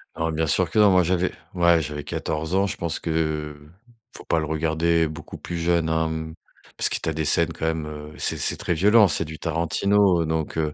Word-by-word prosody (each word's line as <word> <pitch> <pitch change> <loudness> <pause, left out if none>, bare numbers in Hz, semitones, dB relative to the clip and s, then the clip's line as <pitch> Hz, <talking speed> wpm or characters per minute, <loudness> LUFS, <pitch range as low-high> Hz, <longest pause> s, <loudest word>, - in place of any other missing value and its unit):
Alors 80 0 -2
bien 80 +1 0
sûr 85 +5 +2
que 115 - -4
non. 105 -2 +6
Moi 90 -1 +4
j'avais 90 +1 0 0.2
ouais, 85 -2 +3
j'avais 75 -1 -5
14 80 +3 -3
ans. 100 +1 +2
Je - - -2
pense 85 -2 -2
que, 80 -2 -2 0.6
faut - - -11
pas 80 - +1
le 80 - -2
regarder 80 +1 +1
beaucoup 75 - -9
plus 85 - -6
jeune, 85 -1 +1
hein, 80 0 0
mmh, 80 0 -5 0.4
parce - - +1
que - - -1
tu - - -5
as 80 - 0
des 80 - -2
scènes 85 +2 +2
quand - - -5
même, 80 -1 -1
heu, 75 0 -9
c'est - - +1
c'est - - +1
très 85 - -1
violent, 105 +5 +5
c'est 80 +1 +3
du 80 0 -9
Tarantino, 85 +2 +1
donc, 80 0 -3
heu, 75 -1 -1
80 Hz, 230 wpm, -23 LUFS, 80-85 Hz, 0.6 s, non